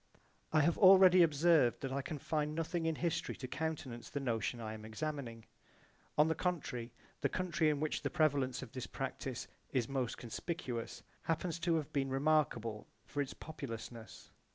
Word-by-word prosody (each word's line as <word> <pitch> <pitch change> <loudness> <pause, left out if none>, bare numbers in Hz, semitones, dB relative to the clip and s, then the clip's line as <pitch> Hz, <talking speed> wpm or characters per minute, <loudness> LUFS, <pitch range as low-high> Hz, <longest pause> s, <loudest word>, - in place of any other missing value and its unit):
I 155 - +5
have 165 +3 +2
already 185 -1 +9
observed 155 -4 +4
that 135 - -3
I 140 +1 -1
can 150 +3 -5
find 150 +1 -1
nothing 165 +1 -1
in 160 - +1
history 170 +1 -1
to 130 - -6
countenance 145 -5 -4
the 145 - -3
notion 115 -4 -1
I 110 -1 -4
am 110 0 -8
examining. 115 0 -5 0.7
On 150 +1 +6
the 160 - +2
contrary 145 -9 -2 0.3
the - - +2
country 175 -4 +1
in 150 -2 0
which 155 0 -1
the - - -1
prevalence 140 -5 +1
of 120 - -10
this 130 - -5
practise - - -4
I - - -7
is 120 - +1
most 130 -3 -2
conspicuous 120 -1 -4 0.2
happens 165 +1 -1
to 170 0 +2
have 155 -3 -2
been 135 -1 +1
remarkable 135 -6 +1 0.2
for 145 - -2
its 140 - -4
populousness. 115 -6 -8
145 Hz, 175 wpm, -35 LUFS, 120-160 Hz, 0.7 s, already